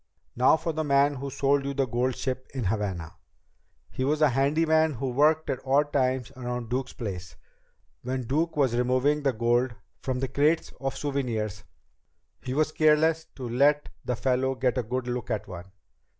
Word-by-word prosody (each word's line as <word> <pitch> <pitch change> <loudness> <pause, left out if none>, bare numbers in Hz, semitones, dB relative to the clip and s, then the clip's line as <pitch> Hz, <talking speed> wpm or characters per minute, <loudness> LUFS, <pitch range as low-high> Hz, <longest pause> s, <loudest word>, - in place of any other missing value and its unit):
"Now 130 +5 +5
for 165 0 -3
the 155 +1 -1
man 140 0 +3
who 140 +2 -5
sold 140 +1 +1
you 140 0 -3
the 135 -1 +2
gold 125 +2 -1
ship 130 -1 -3
in 130 - -2
Havana. 95 -5 -2 0.7
He 130 - -3
was 150 +3 +1
a 150 - +6
handyman 155 +4 +2
who 130 +1 -3
worked 155 +4 +3
at 130 - -3
odd 145 +2 +2
times 130 -2 0
around 125 -2 -5
Duke's 130 +1 -2
place. 90 -7 -6 0.7
When 130 +1 -3
Duke 155 +6 -1
was 130 -5 +2
removing 130 +4 +2
the 140 -2 +2
gold 120 +1 +1 0.3
from 130 -2 -2
the 135 - -1
crates 150 +5 +1
of 135 0 -3
souvenirs, 115 -8 -2 0.8
he 130 +1 -4
was 155 +1 +2
careless 155 +1 +3
to 130 -2 -6
let 145 +5 +2
the 125 - -1
fellow 130 +2 0
get 125 -1 0
a - - +2
good 125 +2 -3
look 125 0 -4
at 110 -3 -2
one. 90 +1 -9
130 Hz, 180 wpm, -27 LUFS, 125-145 Hz, 0.8 s, a